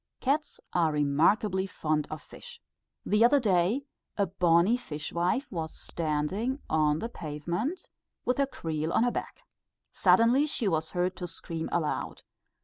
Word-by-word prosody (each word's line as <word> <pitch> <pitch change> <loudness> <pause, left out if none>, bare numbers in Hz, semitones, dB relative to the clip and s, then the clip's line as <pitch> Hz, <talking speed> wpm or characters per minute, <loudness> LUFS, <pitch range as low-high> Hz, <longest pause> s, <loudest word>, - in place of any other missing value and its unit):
Cats 290 +4 -1
are 165 -3 +3
remarkably 175 +7 +2
fond 155 -4 -1
of 155 0 -7
fish. 485 -1 -11 0.5
The 210 +2 +3
other 280 +4 +6
day, 205 +3 +2 0.3
a 200 - +3
bonnie 180 +3 +3
fishwife 175 - -2
was 160 -4 -4
standing 170 - -2
on 150 -1 +2
the 200 - -3
pavement 175 - -4 0.4
with 250 +3 +1
her 275 - +3
creel 160 - -3
on - - +4
her 245 - +2
back. - - -6 0.5
Suddenly 245 +6 +4
she 250 -7 -1
was 160 -3 0
heard 180 +2 -1
to 180 - -4
scream 165 -1 -5
aloud. 160 -3 -2
180 Hz, 140 wpm, -29 LUFS, 160-235 Hz, 0.5 s, other